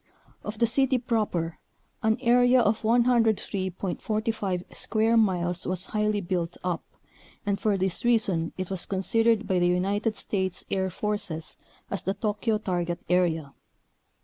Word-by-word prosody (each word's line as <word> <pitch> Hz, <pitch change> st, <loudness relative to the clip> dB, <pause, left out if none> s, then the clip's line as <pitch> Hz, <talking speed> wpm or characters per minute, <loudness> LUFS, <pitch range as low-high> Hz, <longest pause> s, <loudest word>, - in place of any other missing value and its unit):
Of 210 Hz, +1 st, -5 dB
the 235 Hz, -, +4 dB
city 260 Hz, +3 st, +3 dB
proper 210 Hz, -9 st, -1 dB, 0.4 s
an 220 Hz, 0 st, +2 dB
area 245 Hz, +1 st, +5 dB
of 220 Hz, -1 st, +2 dB
103.45 215 Hz, -3 st, 0 dB
square 220 Hz, +1 st, +1 dB
miles 180 Hz, -5 st, +1 dB
was 185 Hz, 0 st, -1 dB
highly 210 Hz, -1 st, 0 dB
built 175 Hz, -2 st, -2 dB
up, 180 Hz, -2 st, -2 dB, 0.6 s
and 200 Hz, -1 st, 0 dB
for 210 Hz, -2 st, +1 dB
this 190 Hz, -1 st, -1 dB
reason 215 Hz, -9 st, +2 dB
it 185 Hz, 0 st, -4 dB
was 190 Hz, -2 st, -3 dB
considered 225 Hz, +3 st, +2 dB
by 185 Hz, -3 st, +2 dB
the 175 Hz, -, +3 dB
United 200 Hz, +5 st, +1 dB
States 190 Hz, -4 st, -2 dB
Air 190 Hz, -1 st, +1 dB
Forces 185 Hz, -5 st, -4 dB, 0.4 s
as 200 Hz, -, -2 dB
the 195 Hz, -, -2 dB
Tokyo 215 Hz, +1 st, 0 dB
target 175 Hz, -4 st, -2 dB
area. 165 Hz, -5 st, +1 dB
200 Hz, 135 wpm, -27 LUFS, 180-225 Hz, 0.6 s, area